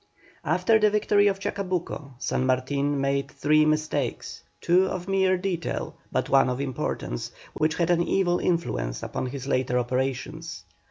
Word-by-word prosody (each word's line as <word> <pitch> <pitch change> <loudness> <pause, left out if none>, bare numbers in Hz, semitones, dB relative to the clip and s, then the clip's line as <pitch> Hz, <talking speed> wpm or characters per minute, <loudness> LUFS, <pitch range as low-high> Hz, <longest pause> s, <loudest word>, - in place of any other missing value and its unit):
After 180 +8 +3
the 215 0 +5
victory 205 -1 +3
of 195 -1 +1
Chacabuco, 180 -8 -3
San 130 - -1
Martin 140 +2 0
made 140 0 0
three 155 +1 +3
mistakes, 155 0 -1 0.2
two 185 +2 +3
of 185 -1 -4
mere 190 -1 +2
detail, 180 -2 -3 0.2
but - - 0
one 135 -1 +4
of 125 +1 -2
importance, 130 - -3 0.2
which 155 +1 0
had 175 0 +1
an 170 -1 +3
evil 175 0 +1
influence 60 - -1
upon - - -3
his 135 0 -6
later 130 -2 0
operations. 130 +6 -2
155 Hz, 150 wpm, -26 LUFS, 135-185 Hz, 0.2 s, the